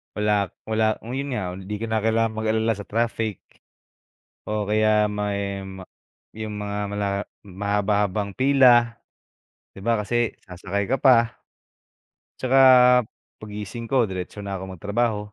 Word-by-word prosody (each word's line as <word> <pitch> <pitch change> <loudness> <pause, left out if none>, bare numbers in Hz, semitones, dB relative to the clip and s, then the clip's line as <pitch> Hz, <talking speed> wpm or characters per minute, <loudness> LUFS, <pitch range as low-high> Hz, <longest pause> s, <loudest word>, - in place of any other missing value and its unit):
Wala 105 -1 +1 0.2
wala, 110 0 +2
oh, 115 - -9
yun 135 0 -3
nga, 95 -6 -3
hindi 95 +2 -7
ko - - -1
na 110 - +1
kailangan 110 +1 +1
mag-alala 110 +1 +1
sa 100 - -8
traffic 115 -2 -2 1.1
o 105 0 -1
kaya 105 0 +2
may 100 -1 -2
ma 95 0 -9 0.5
yung 110 -1 -6
mga 105 0 -4
mala 100 0 -2 0.4
mahaba-habang 100 +1 -1
pila. 125 -2 +4 0.8
Di 95 - -10
ba 115 0 +2
kasi 120 +2 0 0.2
sasakay 95 +2 -3
ka 135 - +1
pa. 120 -3 +5 1.1
Tsaka, 130 +1 +3 0.8
paggising 105 +2 -7
ko, 125 -4 +4
diretso 95 +1 -6
na 100 -1 -4
ako 95 -1 -8
magtrabaho. 105 +3 0
105 Hz, 135 wpm, -23 LUFS, 100-115 Hz, 1.1 s, pa